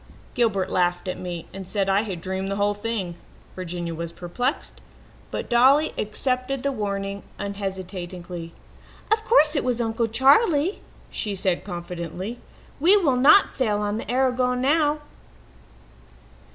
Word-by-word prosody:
Gilbert 215 -6 +1
laughed 175 0 +1
at 185 - -3
me 175 -2 -5
and 190 -1 -7
said 195 0 0
I 195 +1 +3
had 190 -6 -5
dreamed 190 +2 -3
the 195 - -1
whole 205 +1 +1
thing. 205 -5 -3 0.4
Virginia 175 -2 -4
was 165 0 -5
perplexed, 245 - -3 0.5
but - - -4
Dolly 265 +6 +4
accepted 255 +4 -2
the 280 - +1
warning 200 -4 -3 0.2
unhesitatingly. 185 -3 -5 0.6
"'Of 435 0 +3
course 320 -10 +4
it 285 - +1
was 250 -2 0
Uncle 225 0 0
Charley,' 290 - +4 0.3
she 210 -3 -1
said 185 -2 0
confidently. 180 +4 -6 0.4
'We 360 +8 +6
will 300 -10 +2
not 280 +10 +6
sail 215 -6 0
on 205 0 -1
the - - -6
Aragon 250 -1 +1
now.' 295 +2 +2
205 Hz, 140 wpm, -24 LUFS, 185-255 Hz, 0.6 s, We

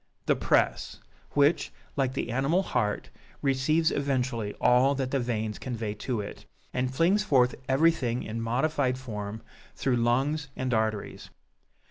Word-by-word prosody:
THE - - +3
PRESS; - - +1 0.3
which, 145 +3 +3 0.2
like 135 -2 0
the 120 -3 -3
animal 140 +9 +2
heart, 105 - -1 0.3
receives 145 +4 +2
eventually 125 -7 -1
all 130 +3 +4
that 130 -1 -2
the 140 - +1
veins 110 -3 -2
convey 115 -4 -3
to 115 +2 -3
it, 100 - -9 0.3
and 125 0 0
flings 175 +9 +3
forth 130 -10 +3 0.2
everything 135 -4 +2
in 115 +1 -4
modified 130 +2 0
form 110 -4 -6 0.3
through 130 -3 +1
lungs 135 +6 +1
and 130 -1 -2
arteries. 110 -2 -2
130 Hz, 135 wpm, -28 LUFS, 115-140 Hz, 0.3 s, all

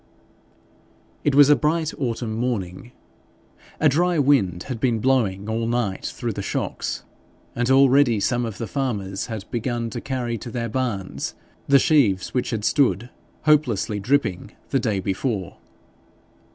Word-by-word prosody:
It 145 -2 +2
was 145 0 +7
a - - +7
bright 155 +3 0
Autumn 120 -4 -2
morning. 115 -3 -3 0.9
A 155 - +4
dry 175 +5 +2
wind 125 - +2
had 125 -4 -5
been 120 -2 +1
blowing 110 -5 +1
all 115 +1 -1
night 115 -5 -1
through - - -4
the - - -4
shocks, - - -3 0.5
and 120 +1 0
already 135 -3 +5
some 120 +5 0
of 110 -4 -4
the 115 - -3
farmers 105 -8 -3
had 110 -5 -6
begun 120 0 -2
to - - -5
carry 125 -4 -3
to 120 - -7
their 115 -1 -3
barns 110 -6 -3 0.3
the 140 - +6
sheaves 130 - +2
which 125 - 0
had 110 -3 -2
stood 125 -4 +2 0.3
hopelessly 125 -9 +2
dripping 105 -5 0 0.2
the 135 - +2
day 110 -5 0
before. 95 +1 -3
120 Hz, 145 wpm, -23 LUFS, 105-135 Hz, 0.9 s, was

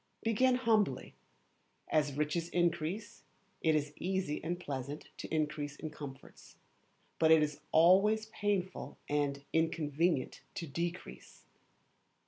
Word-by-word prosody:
Begin 250 +3 +3
humbly. 220 - +1 0.7
As 145 -2 +1
riches 150 +3 0
increase, 175 +6 -1 0.4
it 160 -1 +3
is 150 -1 -1
easy 185 -5 -2
and 175 +2 -2
pleasant 140 -2 -5
to - - -7
increase 150 -2 -1
in 155 0 -6
comforts; 140 -3 -10 0.6
but 160 - +5
it 160 -1 +7
is 150 0 -2
always 195 +7 +5
painful 205 -4 -2
and 140 -1 -1
inconvenient 160 -2 +1
to 170 - -3
decrease. 165 - -5
160 Hz, 110 wpm, -33 LUFS, 150-185 Hz, 0.7 s, it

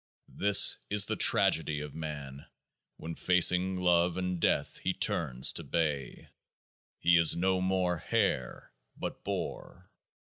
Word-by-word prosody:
This 100 0 +4
is 105 -1 +4
the - - -2
Tragedy 80 -2 +2
of 75 -1 -8
Man 70 -3 -8 0.5
when 85 - -8
facing 90 +1 +2
Love 90 -1 +1
and 90 -1 -4
Death - - -1
he - - -3
turns 65 0 +1
to - - -5
bay. 75 -6 -4 0.7
He 85 0 +2
is 85 -1 +5
no 95 +1 -1
more 95 -2 -1
hare, 65 -4 -3 0.3
but - - -7
boar. 90 +1 -7
85 Hz, 125 wpm, -29 LUFS, 75-90 Hz, 0.7 s, is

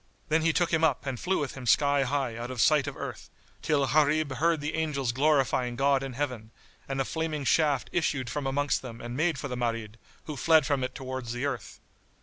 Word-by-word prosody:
Then 160 +1 +3
he 165 +1 +3
took 170 +1 0
him 160 0 +2
up 145 -4 +2
and 130 -3 -3
flew 185 +3 0
with 145 - -2
him 130 -2 -8
sky 140 +3 +4
high 135 -3 -1
out 120 +1 -5
of 130 -2 -6
sight 145 +3 +4
of 145 - -5
earth, - - -7 0.3
till 145 -3 +2
Gharib 150 -2 +2
heard 165 +2 +2
the 150 +2 -3
angels 150 -6 -1
glorifying 130 -3 +2
God 135 +1 +2
in 135 -1 -5
Heaven, 125 -5 -3 0.4
and 135 0 -2
a 135 - +1
flaming 160 -2 -2
shaft 145 0 +2
issued 145 -6 0
from 135 +3 -3
amongst 145 +1 0
them 115 -3 -8
and 120 +1 -6
made 160 +1 +1
for 140 - -4
the 125 - -4
Marid, 115 -2 -3 0.2
who 155 - -6
fled 160 +2 +4
from 135 -1 0
it 130 0 -4
towards 130 -2 -5
the 120 +3 -2
earth. 130 -6 -4
140 Hz, 220 wpm, -28 LUFS, 125-150 Hz, 0.4 s, sky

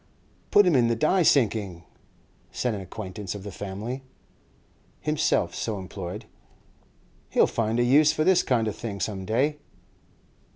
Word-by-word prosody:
'Put 205 -1 +6
him 180 - +3
to 130 - +5
the 115 0 +2
die 155 +10 +2
sinking,' 105 - +2 0.7
said 125 -2 -1
an 100 - -4
acquaintance 95 0 -7
of 100 - -8
the 100 - -7
family, 105 +7 -5 1.0
himself 150 - 0
so 110 -3 -3
employed; 95 +2 -7 1.0
'he'll - - +4
find 115 +1 -1
a - - +4
use 145 +5 +5
for 155 0 0
this 185 +1 +4
kind 115 -4 +1
of 105 - -3
thing 105 -4 -6
some 95 -2 -3
day. 140 +8 0
110 Hz, 150 wpm, -26 LUFS, 100-140 Hz, 1.0 s, Put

